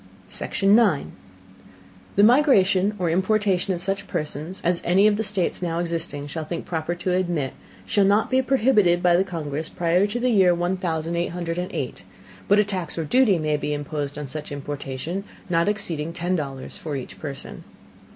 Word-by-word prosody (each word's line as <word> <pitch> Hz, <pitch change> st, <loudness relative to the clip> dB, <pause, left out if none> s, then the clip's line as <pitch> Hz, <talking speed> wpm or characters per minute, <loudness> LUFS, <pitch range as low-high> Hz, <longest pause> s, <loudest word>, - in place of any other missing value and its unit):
Section 200 Hz, +1 st, +2 dB
9. 235 Hz, 0 st, +3 dB, 1.0 s
The 200 Hz, -, +5 dB
Migration 210 Hz, -6 st, +4 dB
or 175 Hz, -3 st, 0 dB
Importation 190 Hz, 0 st, +1 dB
of 175 Hz, -, -7 dB
such 195 Hz, +1 st, -2 dB
Persons 155 Hz, +4 st, -4 dB
as 175 Hz, 0 st, +1 dB
any 190 Hz, +4 st, +4 dB
of 215 Hz, -1 st, +5 dB
the 220 Hz, -, -1 dB
States 195 Hz, -4 st, -1 dB
now 170 Hz, -2 st, -2 dB
existing 165 Hz, -4 st, -3 dB
shall 155 Hz, +2 st, -5 dB
think 165 Hz, +2 st, -5 dB
proper 165 Hz, 0 st, -2 dB
to 180 Hz, +1 st, -2 dB
admit, 175 Hz, -7 st, -1 dB, 0.3 s
shall 200 Hz, -, +2 dB
not 205 Hz, +5 st, +3 dB
be 260 Hz, 0 st, +4 dB
prohibited 215 Hz, -10 st, +3 dB
by 175 Hz, -1 st, +5 dB
the 185 Hz, -, +4 dB
Congress 160 Hz, -4 st, -4 dB
prior 175 Hz, +3 st, +2 dB
to 235 Hz, +4 st, -3 dB
the 250 Hz, +1 st, +1 dB
Year 185 Hz, -5 st, +5 dB
one 175 Hz, +2 st, 0 dB
thousand 170 Hz, -2 st, -2 dB
eight 170 Hz, 0 st, -1 dB
hundred 170 Hz, 0 st, -3 dB
and 180 Hz, -, -4 dB
eight, 130 Hz, -, -4 dB, 0.5 s
but 205 Hz, -, +5 dB
a 210 Hz, -, +5 dB
Tax 185 Hz, -6 st, -3 dB
or 165 Hz, -, -1 dB
Duty 240 Hz, -, +4 dB
may 155 Hz, -2 st, 0 dB
be 150 Hz, 0 st, -2 dB
imposed 145 Hz, -1 st, -4 dB
on 150 Hz, -, -4 dB
such 150 Hz, +3 st, -6 dB
Importation, 145 Hz, +5 st, -5 dB, 0.3 s
not 170 Hz, +3 st, +3 dB
exceeding 165 Hz, -6 st, -2 dB
ten 175 Hz, +2 st, -1 dB
dollars 135 Hz, -5 st, -5 dB
for 150 Hz, -3 st, -4 dB
each 130 Hz, -, -7 dB
Person. 140 Hz, -3 st, -7 dB
175 Hz, 185 wpm, -24 LUFS, 155-195 Hz, 1.0 s, The